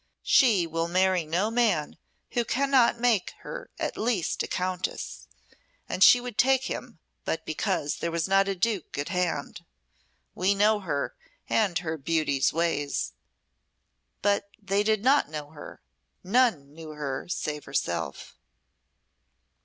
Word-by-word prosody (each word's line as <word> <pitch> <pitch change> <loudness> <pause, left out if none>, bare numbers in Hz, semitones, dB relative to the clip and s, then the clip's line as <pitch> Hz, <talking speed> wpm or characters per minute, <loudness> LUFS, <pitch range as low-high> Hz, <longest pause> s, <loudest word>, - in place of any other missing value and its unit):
She 215 -10 +4
will 165 0 -2
marry 185 -1 +2
no 185 +7 0
man 225 -11 +1 0.4
who 240 - +1
cannot 255 -1 +2
make 235 -6 +1
her - - -8
at - - -3
least 220 -6 0
a - - -2
countess, 185 +1 -3 0.6
and 185 - +2
she 245 - +8
would 245 -3 -7
take 265 0 +4
him 225 - -6 0.3
but 160 0 -3
because 155 -2 -1
there 170 - -2
was 170 +1 -1
not 195 0 +3
a 195 - -1
duke 195 -4 -1
at 145 - -3
hand. 180 -3 -2 0.7
We 190 +2 +1
know 210 +1 +3
her, 150 -8 -2 0.3
and 200 -6 +2
her 160 -2 -3
beauty's 145 -2 +1
ways." 145 - -1 1.1
But 200 0 +1
they 195 0 0
did 215 0 +1
not 270 - +4
know 150 -1 -6
her; 150 - -11 0.4
none 185 - +2
knew 160 0 -10
her, 140 -3 -4
save 150 -4 -3
herself. 85 -11 -3
185 Hz, 135 wpm, -27 LUFS, 155-220 Hz, 1.1 s, she